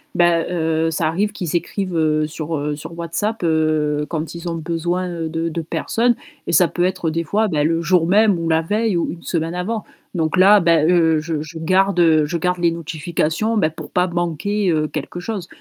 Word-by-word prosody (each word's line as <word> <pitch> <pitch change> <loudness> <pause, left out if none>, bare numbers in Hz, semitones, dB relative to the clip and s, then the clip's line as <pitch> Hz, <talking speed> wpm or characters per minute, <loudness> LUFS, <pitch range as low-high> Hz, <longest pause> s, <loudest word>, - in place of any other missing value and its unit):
bah, 175 -1 +4
heu, 160 -1 0
ça 155 0 0
arrive 200 +6 0
qu'ils 175 -5 -4
écrivent, 185 +1 -2
heu, 155 -1 +1
sur, 155 0 -4
heu, 150 +1 -2
sur 160 +3 -9
WhatsApp, 205 +7 -2
heu, 155 -2 +1
quand 160 0 -4
ils 170 0 -5
ont 165 - -3
besoin, 170 +3 -2
heu, 165 -2 -4
de 165 +1 -2
de 165 0 -3
personnes 230 +8 0 0.3
et - - -3
ça 180 -3 +5
peut 175 - -2
être 180 -3 0
des 165 +1 -1
fois, 215 +7 +1
bah, 150 -6 0
le 165 +1 +1
jour 170 -1 +3
même 205 +1 +4
ou 165 0 -2
la 160 0 +3
veille 210 +3 0
ou 170 - -1
une 170 0 -10
semaine 165 0 -2
avant, 215 +5 -3 0.3
donc 160 -1 0
là, 200 +3 +7
bah, 165 -3 +3
heu, 165 -1 +3
je 155 -2 -3
je 160 +2 -8
garde 175 -2 +3
je 170 +3 -2
garde 180 +2 0
les 170 -1 +3
notifications, 165 +6 -2
bah, 155 -6 +3
pour 160 - -10
pas 180 +1 +2
manquer, 175 +3 -1
heu, 155 -1 0
quelque 155 +4 -5
chose, 195 -3 -5
170 Hz, 210 wpm, -20 LUFS, 160-180 Hz, 0.3 s, là